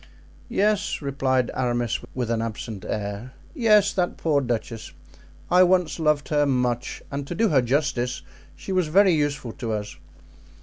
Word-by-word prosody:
"Yes," 205 -1 +1
replied 130 -3 0
Aramis, 120 -2 -1 0.2
with 120 -2 -2
an 115 -1 0
absent 110 -2 -5
air; 105 +4 -4 0.2
"yes, 215 - +4
that 180 -2 -1
poor 150 -3 +1
duchess! 115 -2 -4 0.6
I 180 - +6
once 180 -4 +3
loved 150 -2 +1
her 145 -1 +2
much, 125 -2 -1
and 140 0 -4
to 175 - -4
do 225 +2 +2
her 140 -4 +4
justice, 125 -1 -1 0.3
she - - -8
was 185 -3 +1
very 190 +3 +5
useful 145 -5 -1
to 115 -5 -4
us. 105 -1 -5
140 Hz, 155 wpm, -24 LUFS, 120-170 Hz, 0.6 s, I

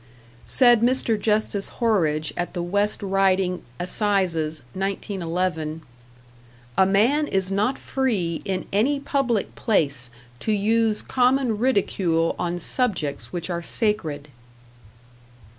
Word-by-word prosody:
Said 240 -3 +5
Mr. 245 -1 +2
Justice 210 -2 0
Horridge, 160 -10 +1
at 175 +2 -3
the 175 - -2
West 205 +4 0
Riding 190 -2 +1 0.2
Assizes, 175 - 0
1911: 180 -4 -3 0.9
"A 190 - +5
man 240 +10 +3
is 190 0 0
not 210 +7 +1
free 205 -12 -1
in 185 -1 -3
any 265 +8 +2
public 270 -6 -1
place 140 - 0 0.3
to 220 - -1
use 215 +1 +2
common 250 -3 +1
ridicule 185 -9 +1
on 175 0 -1
subjects 165 - -1
which 175 0 -4
are 170 0 -2
sacred." 165 -8 -1
195 Hz, 110 wpm, -23 LUFS, 170-225 Hz, 0.9 s, Said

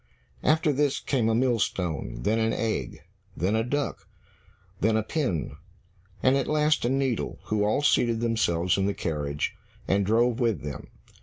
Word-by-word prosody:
After 155 -1 +3
this 140 0 +1
came 120 -5 0
a 110 - +2
millstone, 105 - -1
then 110 +3 +2
an 115 0 +1
egg, 115 -1 -3 0.3
then 95 +6 +1
a 110 - +2
duck, 145 +4 -3 0.7
then 110 +2 +2
a 110 - 0
pin, 115 - -2 0.7
and 130 +1 +5
at 135 - 0
last 150 0 +2
a - - +2
needle, 135 -3 -1
who 105 -1 0
all 110 +7 +1
seated 115 -5 +3
themselves 100 -7 +1
in 95 - +1
the 100 - -1
carriage, 75 -3 -2 0.3
and 100 +1 +2
drove 115 +4 +2
with 115 - 0
them. 75 -2 -6
115 Hz, 160 wpm, -26 LUFS, 100-130 Hz, 0.7 s, and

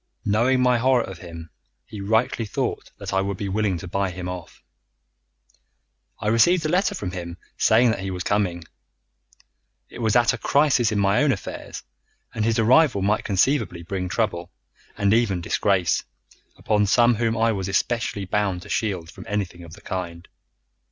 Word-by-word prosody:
Knowing 120 +5 +2
my 125 -1 +3
horror 130 -1 +3
of 95 -2 -9
him, 85 -3 -10 0.3
he 105 - -9
rightly 115 +4 +1
thought - - -3
that - - -6
I 95 - +2
would 100 -1 -3
be 100 - -4
willing 100 -1 0
to 90 - -8
buy 100 +2 -1
him 90 0 -6
off. 90 -2 -8 1.6
I - - -4
received 160 +10 +4
a - - +1
letter 195 +4 +1
from 95 - -4
him 85 -1 -6 0.2
saying 115 +2 +4
that 110 - -3
he 95 0 -4
was 90 -1 -4
coming. 90 -5 0 1.3
It - - -11
was 110 -3 +1
at 120 +1 +4
a 120 - -5
crisis 140 -6 +2
in 105 - -1
my 100 +4 +3
own 145 -2 +3
affairs, - - -6 0.5
and 110 - -2
his 115 +1 +1
arrival 120 -1 +4
might 105 +2 +1
conceivably 100 -4 0
bring 90 +1 -4
trouble, 90 -4 -2 0.5
and 100 0 +2
even 110 -6 +2
disgrace, 90 0 +1 0.5
upon 105 -1 +1
some 120 +3 +4
whom 115 0 0
I 115 +1 +3
was 95 -3 -3
especially 105 0 -1
bound 95 -2 -1
to - - -13
shield 90 -7 -2
from - - -12
anything 95 -4 -3
of 80 -1 -12
the 105 - -13
kind. 85 -3 -5
105 Hz, 175 wpm, -23 LUFS, 90-115 Hz, 1.6 s, received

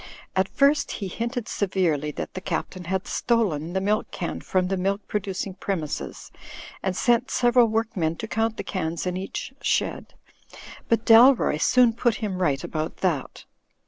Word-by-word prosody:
At 190 0 +2
first 285 +1 +2
he 200 - -4
hinted 235 +4 -3
severely 175 -7 0
that - - -6
the 185 - -6
Captain 185 -1 -4
had 190 +2 -2
stolen 175 -9 0
the 190 - +1
milk 210 +3 0
can 175 - -4
from 185 -1 0
the 195 - 0
milk 195 +2 -1
producing 195 -1 -3
premises, 180 -6 -4 0.5
and 190 -1 -1
sent 240 +3 +2
several 240 -1 +4
work 225 +1 -1
men 165 -3 0
to 220 - -6
count 225 0 -1
the - - -4
cans 170 -3 -3
in 180 0 -1
each 190 +7 -5
shed; - - -1 0.7
but 230 0 +2
Dalroy 235 - +6
soon 250 -2 +5
put 235 -1 +1
him 195 -4 -3
right 140 -6 +1
about 155 0 -4
that. 155 -8 -2
195 Hz, 165 wpm, -25 LUFS, 180-230 Hz, 0.7 s, Dalroy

